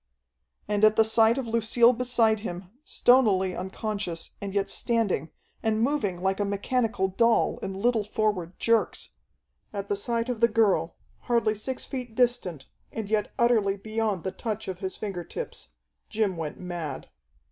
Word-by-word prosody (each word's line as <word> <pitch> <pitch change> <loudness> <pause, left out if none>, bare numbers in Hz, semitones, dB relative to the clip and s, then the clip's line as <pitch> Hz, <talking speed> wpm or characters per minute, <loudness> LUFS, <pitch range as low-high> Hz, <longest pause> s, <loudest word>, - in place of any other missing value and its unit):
And 210 0 0
at 215 0 +6
the 220 - +5
sight 225 +2 +4
of 265 - -2
Lucille 230 +1 +4
beside 230 -3 +2
him, 180 -3 -7
stonily 205 - +3
unconscious, 190 -2 -4
and 200 -1 -4
yet 200 0 0
standing, 220 - 0 0.3
and 220 -1 +1
moving 220 -9 0
like 190 +1 +1
a - - +2
mechanical 205 +1 0
doll, 230 +4 +2
in 190 - -5
little 230 0 +2
forward 205 -4 -1
jerks 230 -1 +1 0.6
at 200 -1 -5
the 205 - +1
sight 230 +3 -1
of 245 -3 -3
the 235 - +5
girl, 205 -8 +2 0.3
hardly 230 -3 +3
six 230 +5 -4
feet 250 -4 -6
distant, 235 - +1 0.3
and 220 -2 -5
yet 215 -1 +1
utterly 220 -5 +3
beyond 215 -3 -2
the 190 - -2
touch 220 +1 -4
of 185 -2 -5
his 190 -1 -4
finger 195 -5 -4
tips, - - -6 0.4
Jim 210 -4 0
went 160 -3 -5
mad. 170 -6 -5
215 Hz, 160 wpm, -27 LUFS, 190-230 Hz, 0.6 s, at